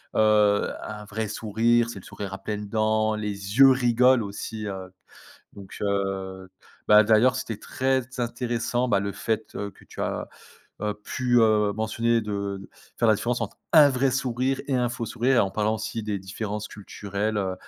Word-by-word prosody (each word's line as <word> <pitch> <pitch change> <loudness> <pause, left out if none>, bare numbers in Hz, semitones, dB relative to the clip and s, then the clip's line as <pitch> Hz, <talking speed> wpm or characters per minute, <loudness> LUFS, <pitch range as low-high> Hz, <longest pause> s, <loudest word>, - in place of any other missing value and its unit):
heu, 105 -1 +3
un 105 -1 -7
vrai 110 +2 -3
sourire, 115 +3 +1
c'est 100 - -7
le - - -16
sourire 100 -1 -7
à - - -4
pleines 105 0 -4
dents. 110 0 +1
Les 100 0 -5
yeux 135 -1 +9
rigolent 125 -1 +4
aussi, 105 +2 -6
heu, 95 -2 -6 0.6
donc 100 -1 -11
heu, 95 -2 -2 0.4
bah, 105 0 +8
d'ailleurs 115 +4 +4
c'était 115 -4 -4
très 130 +3 0 0.2
intéressant, 120 0 -1
bah, 100 - +3
le 100 0 -3
fait, 110 +1 -3
heu, 100 0 -4
que - - -20
tu - - -10
as, - - -3 0.5
heu, 105 -1 -1
pu, 125 -1 0
heu, 105 -2 +3
mentionner 115 +1 +1
de 100 -2 -4 0.3
faire 115 - +3
la 110 - +6
différence 120 +4 -2
entre 115 - -4 0.2
un 150 -3 +8
vrai 130 0 +1
sourire 130 0 -1
et 135 - -1
un 125 -1 +2
faux 120 -1 -4
sourire 120 +4 +1
et - - +5
en 95 - +2
parlant 110 +2 0
aussi 110 +1 -4
des 105 -2 -2
différences 105 +2 -5
culturelles, 105 +1 -4
heu, 95 -2 -1
110 Hz, 180 wpm, -25 LUFS, 100-120 Hz, 0.6 s, yeux